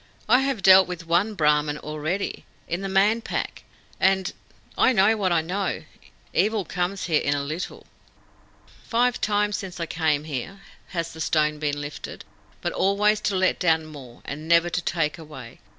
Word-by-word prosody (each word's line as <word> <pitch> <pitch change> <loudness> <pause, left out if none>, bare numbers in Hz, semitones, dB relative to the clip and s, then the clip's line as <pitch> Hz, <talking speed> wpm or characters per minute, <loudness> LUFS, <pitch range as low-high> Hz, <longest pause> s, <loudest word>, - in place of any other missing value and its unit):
"I 250 - +6
have 270 -7 -1
dealt 190 0 +8
with 175 -2 -6
one 180 +6 +1
Brahmin 150 -2 +2
already, 155 +6 -3 0.2
in 175 +2 -2
the 195 - -3
Man 205 +4 +3
Pack, - - -4 0.4
and 190 0 +2 0.4
I 255 - +4
know 215 +1 +4
what 195 -4 0
I 170 -2 +3
know. 180 0 -2 0.5
Evil 210 +1 +1
comes 180 +3 -2
here 160 -3 +2
in 145 - +1
a 140 - -2
little." 155 +6 -5 1.0
"Five 245 +1 +1
times 210 0 +1
since 185 -3 -7
I 170 - -1
came 155 -3 0
here 155 +7 -6 0.3
has 170 -2 -4
the 160 - -8
stone 150 -1 +1
been 145 -1 -1
lifted, 145 0 -7 0.4
but - - -2
always 205 +2 +2
to 205 -2 -1
let 185 0 +2
down 160 -3 +2
more, 135 -6 -12
and 150 +3 -6
never 170 +1 +4
to 175 +2 -1
take 155 -4 -1
away. 150 -7 -11
175 Hz, 170 wpm, -24 LUFS, 155-195 Hz, 1.0 s, dealt